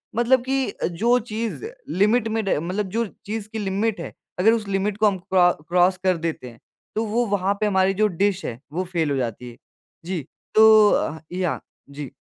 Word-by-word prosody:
मतलब 240 Hz, +1 st, +3 dB
कि 270 Hz, -1 st, 0 dB, 0.2 s
जो 230 Hz, +8 st, +2 dB
चीज़ 225 Hz, -, -4 dB, 0.2 s
लिमिट 215 Hz, +5 st, +2 dB
में 220 Hz, 0 st, -1 dB
ड 195 Hz, -, +1 dB
मतलब 190 Hz, +4 st, -2 dB
जो 230 Hz, +4 st, 0 dB, 0.2 s
चीज़ 215 Hz, 0 st, -4 dB
की 220 Hz, 0 st, -5 dB
लिमिट 205 Hz, +2 st, -1 dB
है, -, -, -6 dB, 0.3 s
अगर 210 Hz, +5 st, +5 dB
उस 220 Hz, -3 st, -2 dB
लिमिट 195 Hz, +1 st, -1 dB
को 215 Hz, 0 st, +4 dB
हम 200 Hz, -2 st, +1 dB
क्रॉ 180 Hz, -1 st, +3 dB, 0.2 s
क्रॉस 180 Hz, +1 st, +3 dB
कर 185 Hz, -2 st, +2 dB
देते 165 Hz, -5 st, -4 dB
हैं 115 Hz, -1 st, -16 dB, 0.4 s
तो 220 Hz, +1 st, 0 dB
वो 230 Hz, +3 st, 0 dB
वहाँ 200 Hz, -2 st, +1 dB
पे 215 Hz, -, +3 dB
हमारी 190 Hz, -1 st, +2 dB
जो 215 Hz, +2 st, +2 dB
डिश 195 Hz, +1 st, 0 dB
है 120 Hz, 0 st, -5 dB
वो 180 Hz, +3 st, -1 dB
फेल 170 Hz, -5 st, -1 dB
हो 140 Hz, -, 0 dB
जाती 125 Hz, -1 st, -4 dB
है। 120 Hz, -, -14 dB, 0.5 s
जी, 175 Hz, -3 st, -2 dB, 0.3 s
तो 215 Hz, -1 st, +8 dB
अ, 160 Hz, +2 st, 0 dB
याह। 180 Hz, -2 st, -1 dB, 0.3 s
जी। 140 Hz, -2 st, -7 dB
195 Hz, 200 wpm, -23 LUFS, 175-220 Hz, 0.5 s, तो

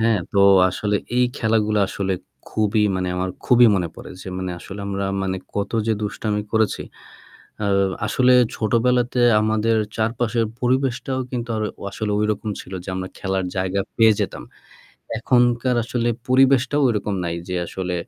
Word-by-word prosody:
হ্যাঁ, 110 Hz, -1 st, +3 dB
তো 100 Hz, -, +1 dB, 0.3 s
আসলে 105 Hz, +3 st, -1 dB, 0.2 s
এই 125 Hz, -, +5 dB
খেলাগুলো 110 Hz, -2 st, +1 dB
আসলে 95 Hz, -1 st, -2 dB, 0.4 s
খুবই 105 Hz, 0 st, +1 dB
মানে 90 Hz, 0 st, -1 dB
আমার 90 Hz, 0 st, -1 dB
খুবই 125 Hz, -1 st, +6 dB
মনে 85 Hz, -3 st, -1 dB
পড়ে -, -, -10 dB
যে -, -, -8 dB
মানে 95 Hz, -1 st, -3 dB
আসলে 100 Hz, +3 st, -9 dB
আমরা 100 Hz, 0 st, -2 dB, 0.2 s
মানে 95 Hz, 0 st, -1 dB, 0.2 s
কত 100 Hz, -1 st, -2 dB, 0.2 s
যে 110 Hz, -, +2 dB
দুষ্টামি 105 Hz, 0 st, -2 dB
করেছি। 110 Hz, -3 st, +1 dB, 0.8 s
আ -, -, +1 dB, 0.4 s
আসলে 125 Hz, +3 st, +3 dB, 0.2 s
ছোটবেলাতে 120 Hz, +2 st, +1 dB, 0.2 s
আমাদের 110 Hz, +1 st, +1 dB, 0.2 s
চারপাশের 115 Hz, +1 st, 0 dB
পরিবেশটাও 130 Hz, +1 st, 0 dB
কিন্তু 120 Hz, -2 st, -4 dB
আর 110 Hz, -, -2 dB, 0.3 s
আসলে 105 Hz, +1 st, -3 dB
ওইরকম 105 Hz, +1 st, -1 dB
ছিল 95 Hz, -, -12 dB
যে -, -, -11 dB
আমরা 95 Hz, 0 st, -4 dB
খেলার 95 Hz, -1 st, -1 dB
জায়গা 95 Hz, +1 st, 0 dB, 0.2 s
পেয়ে 110 Hz, -1 st, +6 dB
যেতাম। -, -, -3 dB, 0.8 s
এখনকার 120 Hz, +1 st, +2 dB
আসলে 120 Hz, 0 st, -1 dB, 0.2 s
পরিবেশটাও 135 Hz, +2 st, +4 dB
ওইরকম 105 Hz, -4 st, 0 dB
নাই 85 Hz, 0 st, -2 dB
যে 90 Hz, -, -3 dB
আসলে 90 Hz, 0 st, -4 dB
110 Hz, 150 wpm, -22 LUFS, 100-120 Hz, 0.8 s, খুবই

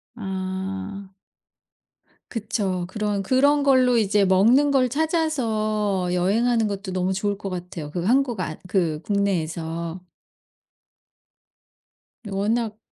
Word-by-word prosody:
아. 190 Hz, -1 st, -5 dB, 1.2 s
그쵸. 195 Hz, -5 st, -2 dB
그런 210 Hz, 0 st, -2 dB
그런 285 Hz, +6 st, +3 dB
걸로 255 Hz, -3 st, +4 dB
이제 210 Hz, -2 st, +3 dB
먹는 220 Hz, +10 st, +4 dB
걸 265 Hz, -2 st, +3 dB
찾아서 225 Hz, -, 0 dB
여행하는 220 Hz, +5 st, +2 dB
것도 200 Hz, -1 st, -4 dB
너무 185 Hz, 0 st, 0 dB
좋을 200 Hz, +1 st, -1 dB
것 195 Hz, -1 st, -5 dB
같아요, 175 Hz, -4 st, -6 dB
그 175 Hz, +1 st, -3 dB
한국 245 Hz, 0 st, +2 dB
아 165 Hz, -3 st, -3 dB
그 165 Hz, -5 st, 0 dB
국내에서. 170 Hz, -3 st, -2 dB, 2.3 s
워낙 215 Hz, +2 st, -1 dB
200 Hz, 195 characters per minute, -23 LUFS, 185-235 Hz, 2.3 s, 걸로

